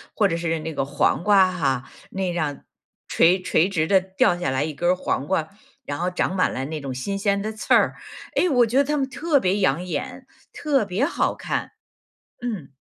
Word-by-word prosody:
或 205 Hz, -, +3 dB
者 165 Hz, -3 st, -2 dB
是 165 Hz, -1 st, -1 dB
那 160 Hz, 0 st, -5 dB
个 135 Hz, -, -1 dB
黄 145 Hz, +4 st, +1 dB
瓜 195 Hz, -3 st, +5 dB
哈， 135 Hz, -8 st, -1 dB, 0.2 s
那 190 Hz, -2 st, -2 dB
样 150 Hz, -5 st, -3 dB, 0.4 s
垂 180 Hz, +3 st, +3 dB
垂 175 Hz, -1 st, +2 dB
直 160 Hz, -5 st, 0 dB
地 190 Hz, +1 st, +5 dB
掉 185 Hz, -1 st, +1 dB
下 175 Hz, -6 st, -2 dB
来 130 Hz, +2 st, 0 dB
一 155 Hz, -, -3 dB
根 175 Hz, +4 st, 0 dB
儿 -, -, +2 dB
黄 145 Hz, -5 st, -2 dB
瓜， 165 Hz, -4 st, 0 dB, 0.4 s
然 145 Hz, 0 st, -4 dB
后 180 Hz, +1 st, -1 dB
长 180 Hz, -, -1 dB
满 185 Hz, -, +2 dB
了 130 Hz, -, -3 dB
那 155 Hz, +2 st, -5 dB
种 135 Hz, -2 st, -5 dB
新 195 Hz, +11 st, -3 dB
鲜 200 Hz, 0 st, 0 dB
的 215 Hz, -, -3 dB
刺 215 Hz, 0 st, -1 dB
儿。 -, -, +4 dB, 0.4 s
哎， 365 Hz, -, +3 dB
我 245 Hz, -5 st, +4 dB
觉 235 Hz, +4 st, -1 dB
得 280 Hz, -, +6 dB
它 300 Hz, +2 st, -1 dB
们 270 Hz, -2 st, -1 dB
特 290 Hz, +2 st, +1 dB
别 190 Hz, -1 st, +1 dB
养 160 Hz, -1 st, +1 dB
眼， 180 Hz, -, -5 dB, 0.3 s
特 280 Hz, -6 st, +1 dB
别 200 Hz, +7 st, 0 dB
好 335 Hz, -, 0 dB
看， -, -, -4 dB, 0.7 s
嗯。 205 Hz, -, -5 dB
185 Hz, 230 characters per minute, -23 LUFS, 155-210 Hz, 0.7 s, 得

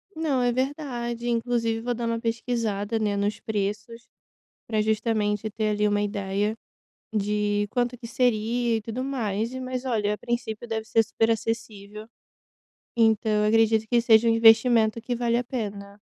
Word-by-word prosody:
Não, 300 Hz, -5 st, 0 dB
é 245 Hz, -, +2 dB
verdade, 240 Hz, -3 st, -3 dB
inclusive 230 Hz, -1 st, 0 dB
vou 245 Hz, +1 st, -1 dB
dar 235 Hz, 0 st, -4 dB
uma 230 Hz, 0 st, -1 dB
pesquisada, 230 Hz, -2 st, -2 dB
né, 210 Hz, -2 st, 0 dB
nos 205 Hz, +1 st, -1 dB
preços, 210 Hz, +3 st, -4 dB, 0.6 s
para 220 Hz, -2 st, 0 dB
justamente 215 Hz, -1 st, 0 dB
ter 215 Hz, 0 st, -1 dB
ali 210 Hz, 0 st, +1 dB
uma 205 Hz, 0 st, +1 dB
ideia 205 Hz, +1 st, -1 dB, 0.6 s
de 205 Hz, 0 st, 0 dB
quanto 245 Hz, +1 st, -1 dB
que 235 Hz, -1 st, -9 dB
seria 235 Hz, -1 st, +1 dB
e -, -, -5 dB
tudo 230 Hz, +4 st, -4 dB
mais, 230 Hz, -3 st, -2 dB
mas 255 Hz, 0 st, -4 dB
olha, 210 Hz, -4 st, 0 dB
a -, -, -5 dB
princípio 235 Hz, -1 st, -4 dB
deve 220 Hz, -1 st, -3 dB
ser 225 Hz, +1 st, +3 dB
super 225 Hz, +1 st, 0 dB
acessível, 215 Hz, -2 st, -4 dB, 0.9 s
então 220 Hz, -1 st, +3 dB
eu 210 Hz, 0 st, +2 dB
acredito 220 Hz, 0 st, +3 dB
que 240 Hz, -1 st, +3 dB
seja 230 Hz, -1 st, +5 dB
um -, -, +4 dB
investimento 225 Hz, 0 st, +5 dB
que 245 Hz, +2 st, -3 dB
vale 235 Hz, -1 st, 0 dB
a 245 Hz, -, 0 dB
pena. 205 Hz, -4 st, -6 dB
225 Hz, 160 wpm, -25 LUFS, 210-240 Hz, 0.9 s, seja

